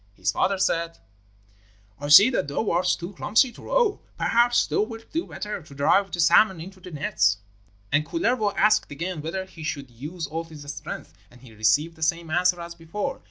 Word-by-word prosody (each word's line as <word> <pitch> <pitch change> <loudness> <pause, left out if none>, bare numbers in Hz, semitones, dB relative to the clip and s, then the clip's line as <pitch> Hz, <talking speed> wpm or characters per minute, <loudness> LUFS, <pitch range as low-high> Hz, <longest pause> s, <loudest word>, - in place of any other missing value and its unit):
His 90 -2 0
father 195 - +1
said: 170 -3 0 1.0
'I 145 - -5
see 195 +11 +9
that 230 - -1
thou 145 +9 -1
art 180 +2 +1
too 175 +3 -7
clumsy 225 +7 +2
to - - -15
row; - - +1 0.2
perhaps 240 +1 +3
thou - - 0
wilt 225 +1 -6
do 330 +2 -2
better 210 -2 -5
to 145 -3 -15
drive 195 +8 +3
the 175 - -5
salmon 190 +2 +5
into 185 +3 -10
the 180 - -11
nets.' 105 - +1 0.5
And 145 +2 +3
Kullervo 240 - 0
asked 215 +1 +3
again 165 +3 -4
whether 180 +5 -4
he 190 -3 -14
should 140 -5 -5
use 155 +8 -6
all 165 +2 -5
his 155 -3 -11
strength, 150 - -8 0.2
and 125 0 -19
he 125 -4 -15
received 150 +10 +1
the - - -16
same 165 0 -1
answer 175 +1 +2
as 170 0 -7
before. 170 +5 -5
170 Hz, 195 wpm, -25 LUFS, 150-200 Hz, 1.0 s, see